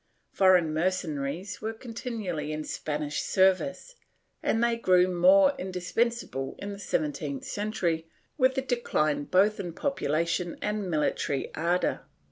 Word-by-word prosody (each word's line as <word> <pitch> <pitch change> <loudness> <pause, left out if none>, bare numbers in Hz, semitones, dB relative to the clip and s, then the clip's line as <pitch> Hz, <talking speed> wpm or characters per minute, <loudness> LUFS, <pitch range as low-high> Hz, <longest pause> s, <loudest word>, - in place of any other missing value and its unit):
Foreign 180 -5 +4
mercenaries 170 +1 -2
were 220 +1 -3
continually 220 - -5
in 155 0 -3
Spanish 150 -1 -3
service, 190 - +1 0.5
and 225 - +1
they 235 0 +3
grew 185 -5 +4
more 280 +11 +5
indispensable 185 - -2
in 200 0 -5
the 200 - -9
seven 155 -6 -1
teenth 140 -3 -5
century 175 -6 -2 0.3
with 260 -2 +3
the 265 - 0
decline 155 - 0
both 205 +5 +3
in 175 -4 -4
population 170 - -1
and 210 -2 -2
military 150 -3 -1
ardor. 175 +3 0
185 Hz, 125 wpm, -28 LUFS, 155-220 Hz, 0.5 s, more